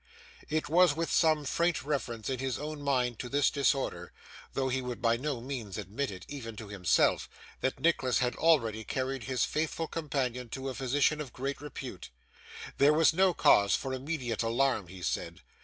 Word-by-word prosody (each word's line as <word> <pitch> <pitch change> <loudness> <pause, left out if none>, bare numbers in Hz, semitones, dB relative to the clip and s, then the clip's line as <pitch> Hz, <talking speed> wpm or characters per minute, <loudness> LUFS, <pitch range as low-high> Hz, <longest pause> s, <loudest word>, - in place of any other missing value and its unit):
It 155 +1 0
was 170 -1 +5
with 165 +1 -2
some 155 -3 +3
faint 170 +1 +1
reference 130 -6 -3
in 130 -2 -2
his 130 -1 -2
own 150 0 -5
mind 125 -4 0
to 125 - -5
this 145 +2 +3
disorder, 140 -1 0 0.4
though 135 -1 0
he 130 0 0
would 125 -2 -5
by 115 0 +3
no 135 +1 -3
means 120 -7 -5
admit 105 +8 -3
it, 95 -2 -8
even 120 -6 -7
to 105 -1 -9
himself, 90 -5 +2 0.3
that 130 - -1
Nicholas 130 -8 +2
had 125 -1 0
already 115 -10 +2
carried 130 +1 -3
his 130 -3 +1
faithful 160 +1 -2
companion 130 -7 -2
to 135 +3 -4
a - - -4
physician 140 +4 +1
of 135 -5 -7
great 140 +3 -4
repute. 130 - -7 0.7
There 145 +2 +6
was 160 +1 +5
no 185 +1 +3
cause 100 -3 +5
for 130 - -3
immediate 130 -4 -3
alarm, 115 -3 +1
he 90 0 -10
said. - - -3
130 Hz, 180 wpm, -30 LUFS, 120-150 Hz, 0.7 s, There